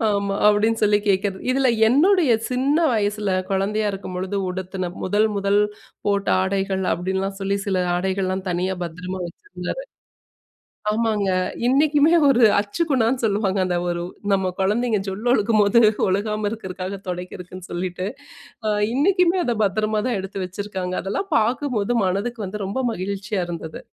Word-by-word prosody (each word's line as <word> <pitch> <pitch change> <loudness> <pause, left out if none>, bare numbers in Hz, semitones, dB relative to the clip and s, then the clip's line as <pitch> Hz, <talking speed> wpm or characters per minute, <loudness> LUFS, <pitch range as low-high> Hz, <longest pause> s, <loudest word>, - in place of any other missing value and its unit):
ஆமா 200 -1 0
அப்படின்னு 215 +2 +2
சொல்லி 205 0 +4
கேட்கிறது. 195 0 +1
இதில 265 -1 +3 0.2
என்னுடைய 315 - +4 0.2
சின்ன 265 +4 +1 0.2
வயசுல 205 -1 0 0.2
குழந்தையா 210 +2 0
இருக்கும்பொழுது 190 0 -4
உடுத்துன 185 0 -4
1 205 +3 +2
1 200 +1 +2 0.5
போட்ட 200 -1 +1
ஆடைகள் 190 0 -1
அப்படின்லாம் 190 +3 -2
சொல்லி 195 +1 0
சில 190 - +1 0.2
ஆடைகள்லாம் 190 +1 -1
தனியா 185 +2 -1
பத்திரமா 180 +3 -6
வச்சிருந்தாரு. 410 - -7 1.1
ஆமாங்க 215 -2 0 0.4
இன்னைக்குமே 295 +4 +4 0.2
ஒரு 250 -3 +4 0.2
அச்சு 205 +10 -1
குணான்னு 250 -1 +2
சொல்லுவாங்க 200 -2 +1
அந்த 180 -1 0
ஒரு 175 0 -2 0.3
நம்ம 190 -1 +1
குழந்தைங்க 215 +3 +1
ஜொல் 195 +5 -5
ஒழுக்கும்போது 215 -1 +4 0.3
ஒழுகாம 210 +2 0
இருக்கிறதுக்காக 190 -2 -6
துடைக்கிறக்குன்னு 180 0 -7
சொல்லிட்டு 180 +1 -3 0.9
இன்னைக்குமே 360 +5 +3
அதை 240 -3 0
பத்திரமா 215 +2 0
தான் 235 -5 0
எடுத்து 195 0 -5
வச்சிருக்காங்க. 185 -1 -4
அதெல்லாம் 205 - -3
பார்க்கும்போது 240 -1 0
மனதுக்கு 210 +3 -2
வந்து 200 +2 -5
ரொம்ப 200 +6 -3 0.2
மகிழ்ச்சியா 195 +1 -3
இருந்தது. 165 -2 -6
200 Hz, 130 wpm, -22 LUFS, 190-225 Hz, 1.1 s, சொல்லி